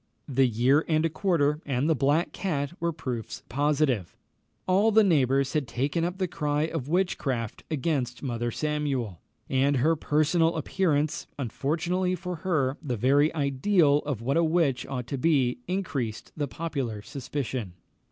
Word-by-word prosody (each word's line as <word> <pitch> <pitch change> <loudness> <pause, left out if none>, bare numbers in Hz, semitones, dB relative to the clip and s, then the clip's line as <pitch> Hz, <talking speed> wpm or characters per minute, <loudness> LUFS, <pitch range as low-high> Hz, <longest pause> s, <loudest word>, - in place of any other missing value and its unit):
The 135 -2 +3
year 125 +6 +3
and 155 0 +2
a 165 - 0
quarter 155 -4 +1
and 135 +1 0
the 165 - +4
black 145 +5 +1
cat 150 -6 -2
were 170 0 0
proofs 130 -8 -5
positive. 140 - 0 0.5
All 200 +4 +4
the 220 +1 +6
neighbours 135 -6 +2
had 150 -5 0
taken 140 +8 -1
up 175 +2 -2
the 185 -1 0
cry 150 -3 -1
of 160 -4 -3
witchcraft 140 - -1
against 140 -5 -1
Mother 120 -3 -2
Samuel; 140 - -2 0.3
and 135 +1 +2
her 155 +6 +3
personal 160 +2 +2
appearance, 155 -2 0
unfortunately 170 - -1
for 180 -1 -5
her, 150 -6 0
the 130 -7 -3
very 140 +7 +3
ideal 145 +2 +3
of 140 -7 -4
what 135 +6 +1
a 170 - +4
witch 160 -6 +1
ought 125 -2 -4
to 135 +2 -4
be, 130 -6 +2
increased 145 - -3
the 145 -2 -2
popular 135 -9 -4
suspicion. 130 -7 -4
145 Hz, 150 wpm, -27 LUFS, 130-165 Hz, 0.5 s, the